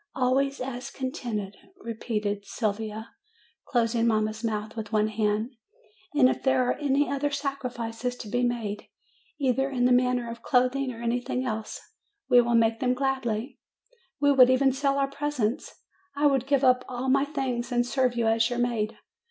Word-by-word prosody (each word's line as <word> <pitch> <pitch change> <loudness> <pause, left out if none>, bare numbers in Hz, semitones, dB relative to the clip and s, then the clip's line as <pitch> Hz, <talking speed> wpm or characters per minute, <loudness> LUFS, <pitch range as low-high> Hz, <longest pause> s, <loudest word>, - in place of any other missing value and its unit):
"Always 270 +2 +1
as 250 -1 -5
contented," 225 -6 -4 0.2
repeated 215 - -3
Sylvia, 215 +1 -3 0.6
closing 235 -1 +1
mamma's 215 0 0
mouth 215 -1 -3
with 220 -2 -6
one 215 -1 +2
hand. 215 +2 0 0.6
"And 270 -4 +6
if - - -1
there 260 -2 +2
are - - +2
any 285 0 +2
other 280 +1 -1
sacrifices 250 -4 -3
to 240 - -9
be 245 +4 -1
made, 225 -4 -2 0.5
either 270 0 +1
in 250 -2 0
the 250 - +4
matter 250 -1 +2
of 230 0 -6
THE - - -27
FIRE 255 -2 +4
249 - - -22
clothing 275 -1 -2
or 230 - -9
anything 245 +2 -1
else, 220 -2 -4 0.5
we 245 -2 +6
will 240 0 +1
make 225 0 +3
them 250 -1 +1
gladly. 260 -3 -2 0.6
We 285 0 +4
would 255 -2 +7
even 265 +1 +4
sell 275 +1 0
our 275 -1 +2
presents. 275 -3 -2 0.4
I 290 +1 +1
would 270 -3 +2
give 280 -1 +2
up 255 -1 +4
all 255 +1 -4
my 275 +1 +4
things, 265 -5 -3
and 240 0 +2
serve 250 -1 +1
you 235 -1 0
as 225 +1 +3
your 245 - -3
maid. 235 -3 -1
245 Hz, 175 wpm, -27 LUFS, 225-270 Hz, 0.6 s, would